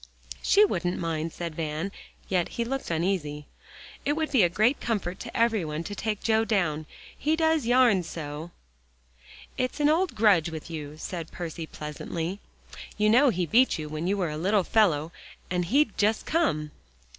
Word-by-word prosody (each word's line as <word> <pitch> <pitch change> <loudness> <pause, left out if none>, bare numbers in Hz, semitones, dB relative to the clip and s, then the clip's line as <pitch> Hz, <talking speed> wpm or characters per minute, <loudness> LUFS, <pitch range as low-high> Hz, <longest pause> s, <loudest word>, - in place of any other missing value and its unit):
"She 415 +1 +5
wouldn't 180 - -1
mind," 165 -1 -2
said 170 -1 -5
Van, 155 +4 -3 0.4
yet 180 -3 0
he 235 - 0
looked 270 +3 -3
uneasy. 160 -4 -1 0.6
"It 290 - +1
would 315 0 -2
be 260 -6 +4
a 175 - +5
great 215 +10 +2
comfort 195 -5 -2
to - - -6
every 225 -4 +2
one, 155 +1 -4
to 205 - -6
take 210 0 -3
Joe 220 -1 +3
down. 165 -9 0 0.3
He 305 +3 +1
does 320 -5 +2
yarn 245 -6 +5
so." 160 -1 -6 1.1
"It's 255 +3 -1
an 295 0 +4
old 335 -2 +1
grudge 200 -7 +4
with 160 +1 -7
you," 150 -2 -6
said 165 0 -6
Percy 165 -2 -6
pleasantly. 160 +5 -5 0.6
"You 210 0 +3
know 260 +5 +6
he 180 -6 0
beat 245 - +4
you 155 -1 -5
when 155 +3 -3
you 200 +2 +1
were 175 -5 -1
a 150 - -4
little 195 +4 +2
fellow, 170 -7 +2 0.4
and 180 -1 0
he'd 260 - +2
just 215 +2 +2
come." 155 - 0
185 Hz, 175 wpm, -27 LUFS, 160-230 Hz, 1.1 s, know